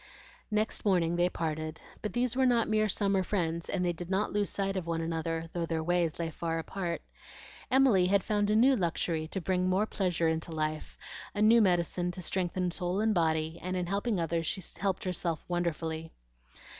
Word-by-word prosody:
Next 215 0 0
morning 175 -4 +2
they 175 +1 +3
parted; 155 -2 -3 0.2
but 210 - -4
these 245 0 0
were 260 0 +4
not 235 -2 +3
mere 215 0 +2
summer 195 -1 +2
friends, 170 -3 -2
and 180 -2 0
they 175 - +1
did 170 +1 -7
not 195 +2 0
lose 205 -1 +1
sight 195 -1 -2
of 185 -3 -3
one 165 -1 -1
another, 165 0 -2
though 170 -1 -2
their 160 -1 -1
ways 170 -1 +1
lay 165 -1 -2
far 165 +1 -2
apart. 170 +1 -3 0.7
Emily 250 -9 +5
had 195 0 +3
found 205 -1 +1
a 210 - +3
new 260 +5 +6
luxury 170 -4 -1
to 190 - -3
bring 185 0 0
more 190 +3 +2
pleasure 180 -6 0
into 160 +1 -1
life, 155 -1 -3 0.4
a 205 - -1
new 230 +2 +7
medicine 175 -2 +1
to 185 - -7
strengthen 180 0 -1
soul 180 +2 -2
and 220 0 +2
body; 160 -2 +1
and 185 +1 -2
in 180 - -1
helping 200 +3 -1
others, 165 -1 -1
she 190 - 0 0.2
helped 195 -2 -1
herself 170 -3 -2
wonderfully. 165 -2 -2
180 Hz, 195 wpm, -30 LUFS, 165-200 Hz, 0.7 s, new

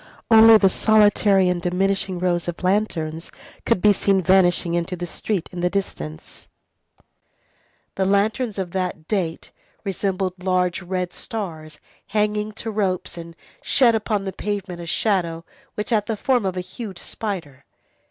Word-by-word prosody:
Only 225 0 +9
the 200 - +4
solitary 205 -2 +4
and 180 -1 0
diminishing 190 +1 0
rows 175 -1 0
of 175 +1 -5
lanterns 170 -5 -1 0.4
could 180 - +2
be 210 -1 +7
seen 195 -1 +1
vanishing 175 -2 +3
into 175 +2 -1
the 175 0 -5
street 180 +1 -3
in 180 - -7
the 180 0 +1
distance. 80 - -5 1.5
The 190 - 0
lanterns 210 +3 +1
of 185 -3 -3
that 180 -4 -3
date 175 -6 -2 0.3
resembled 190 -2 -2
large 180 -1 +1
red 180 -1 -3
stars, 160 -8 -6 0.3
hanging 210 0 0
to 225 +1 -5
ropes, 195 -4 -1
and 170 -1 -9 0.3
shed 245 -4 +4
upon 210 -2 -1
the 190 - -4
pavement 195 -4 -4
a 170 - -8
shadow 170 -5 0 0.3
which 210 +3 -4
had 210 -2 +1
the 225 - -2
form 245 -3 +1
of 185 -1 -3
a - - -1
huge 190 +1 -8
spider. 170 -11 -6
190 Hz, 150 wpm, -22 LUFS, 175-210 Hz, 1.5 s, Only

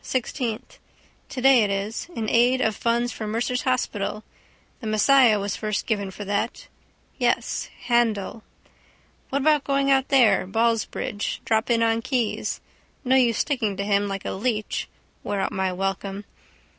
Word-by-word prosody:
Sixteenth. 245 -3 -3 0.5
Today 265 -1 +4
it 210 - +1
is. 200 +6 -3
In 220 -1 -2
aid 245 +4 +3
of 220 -4 +1
funds 235 +2 0
for 215 - -6
Mercer's 240 +3 -1
hospital. 220 -5 -1 0.6
The 225 - -6
Messiah 220 +1 +5
was 200 0 -2
first 215 -1 -2
given 205 -4 -1
for 205 +2 -8
that. 205 +4 -2 0.5
Yes. - - 0
Handel. 230 -3 +1 0.9
What 280 0 -1
about 300 -2 +4
going 275 0 +1
out 270 -1 +3
there: 250 -8 +4
Ballsbridge. 225 -1 -1
Drop 220 +1 +1
in 230 -1 +3
on 225 0 +2
Keyes. 250 -3 -2 0.4
No 255 +1 +3
use 240 -4 +3
sticking 225 -9 -1
to 200 - -2
him 200 0 +1
like 195 -1 -5
a - - -2
leech. 215 0 -2 0.3
Wear 205 -1 -2
out - - -1
my 190 -1 -1
welcome. 195 +2 -3
225 Hz, 150 wpm, -24 LUFS, 205-250 Hz, 0.9 s, Messiah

